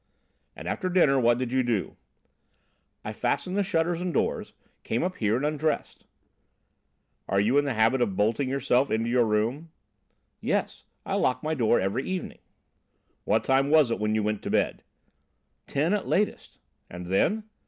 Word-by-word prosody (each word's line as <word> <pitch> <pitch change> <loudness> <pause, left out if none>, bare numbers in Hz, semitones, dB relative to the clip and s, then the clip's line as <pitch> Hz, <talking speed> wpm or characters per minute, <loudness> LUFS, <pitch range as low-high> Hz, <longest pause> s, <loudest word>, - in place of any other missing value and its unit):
"And - - -9
after 185 -3 -2
dinner, 155 -7 +4
what 120 -1 +3
did 125 -1 -3
you 130 0 +2
do?" 120 -6 -1 1.1
"I 105 - -4
fastened 140 - -2
the 205 - +2
shutters 170 -2 0
and 180 0 -2
doors, - - -1 0.3
came 115 - -1
up 180 +1 -2
here 110 -1 +1
and 130 +4 -1
undressed." 155 +1 -2 1.2
"Are 100 - +2
you 115 +8 +3
in 145 - 0
the 135 -4 -1
habit 115 +4 +3
of 105 -6 0
bolting 115 +7 +1
yourself 135 0 +1
into 115 +2 0
your 120 -1 +3
room?" 115 +9 -1 0.7
"Yes, - - -2 0.2
I - - -3
lock 125 0 0
my 155 +1 -1
door 120 -5 +2
every 100 +8 -1
evening." 185 -1 -4 0.9
"What - - +2
time 135 +1 +2
was 150 -5 +5
it - - -1
when 105 0 0
you 110 - +1
went 105 0 -1
to - - -5
bed?" - - 0 0.9
"Ten 155 +7 0
at 210 - -1
latest." 210 +2 -1 0.3
"And 90 0 -8
then?" 165 - +1
130 Hz, 170 wpm, -26 LUFS, 110-155 Hz, 1.2 s, was